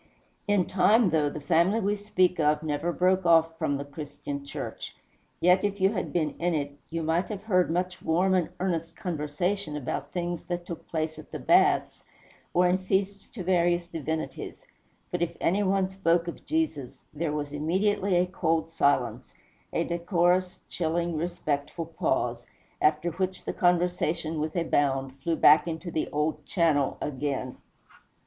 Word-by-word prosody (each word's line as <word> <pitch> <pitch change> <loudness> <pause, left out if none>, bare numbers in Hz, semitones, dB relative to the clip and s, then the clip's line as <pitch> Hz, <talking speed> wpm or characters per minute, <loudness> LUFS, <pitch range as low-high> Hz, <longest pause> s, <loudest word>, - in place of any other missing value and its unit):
In 205 -3 +3
time, 200 +2 +4
though 150 -2 +2
the 150 - -6
family 170 +7 +2
we 205 0 +1
speak 195 -4 +1
of 150 0 +2
never 155 +3 -1
broke 185 +2 +2
off 165 -1 +4
from 140 - 0
the 140 - -5
Christian 145 -1 -7
Church, 140 - -6 0.4
yet 180 +2 +4
if 205 0 -1
you 190 +1 +4
had - - -3
been 155 -4 0
in 175 0 +1
it, 145 -1 -3
you 165 0 -3
might 165 +3 +1
have 205 -2 -6
heard 185 -6 +2
much 180 +1 -2
warm 180 +4 +2
and 175 -4 +2
earnest 165 -3 -2
conversation 170 0 -2
about 135 -4 -4
things 175 -2 -3
that 175 -1 -4
took 170 - -8
place 160 -1 -3
at - - -13
the - - -4
baths, - - +3 0.5
or 180 +1 +4
in 180 +1 +2
feasts 195 +1 -1
to 200 - -7
various 175 -1 +2
divinities; 160 -1 -5 0.5
but 175 - -2
if 170 -1 -1
any 195 +5 +2
one 195 -1 +2
spoke 175 -3 +1
of 170 - -7
Jesus, 310 - -2
there 155 +1 -2
was 145 -1 -3
immediately 190 +5 +1
a 175 +1 +4
cold 165 -2 -1
silence, 140 - 0 0.4
a - - 0
decorous, 175 +1 +1
chilling, 170 0 -1
respectful 155 -1 -2
pause, 125 -7 -1 0.4
after 155 +3 +2
which 185 +2 -3
the - - -2
conversation, 175 -3 +1
with 155 +1 -3
a 170 - +1
bound, 135 -4 +1
flew 165 +4 0
back 155 +2 +6
into 165 +1 -4
the 155 - -1
old 150 +1 -1
channel 150 -4 +1
again. 135 -2 -3
170 Hz, 165 wpm, -27 LUFS, 155-185 Hz, 0.5 s, back